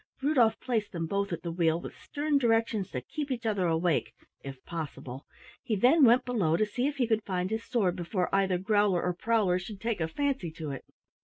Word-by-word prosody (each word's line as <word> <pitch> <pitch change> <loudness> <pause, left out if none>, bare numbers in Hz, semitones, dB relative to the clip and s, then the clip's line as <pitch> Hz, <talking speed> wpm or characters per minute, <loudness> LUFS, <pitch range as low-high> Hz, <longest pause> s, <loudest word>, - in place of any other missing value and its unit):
Rudolf 255 -6 +3
placed 220 -5 -2
them 165 -2 -2
both 200 +3 -1
at 170 - -4
the 170 - -3
wheel 165 -1 +1
with - - -9
stern 290 -1 -1
directions 225 -5 +1
to 125 - -4
keep 290 - -5
each 240 -3 -3
other 200 -5 +1
awake 165 0 +1 0.3
if 135 -1 -9
possible. 140 -5 -6 0.3
He 220 - -1
then 260 - +5
went 240 +2 +5
below 190 -10 +1
to 215 - +2
see 245 +5 -1
if 290 - -3
he 260 -3 +1
could 220 -1 +1
find 185 0 -2
his 220 +1 -2
sword 195 -8 0
before 180 +1 -2
either 195 -2 +2
Growler 205 -1 +2
or 180 - 0
Prowler 195 -2 +1
should 195 +2 -8
take 225 -3 -2
a 160 - +1
fancy 270 - -1
to 155 -2 -5
it. 135 - -7
200 Hz, 215 wpm, -29 LUFS, 170-230 Hz, 0.3 s, then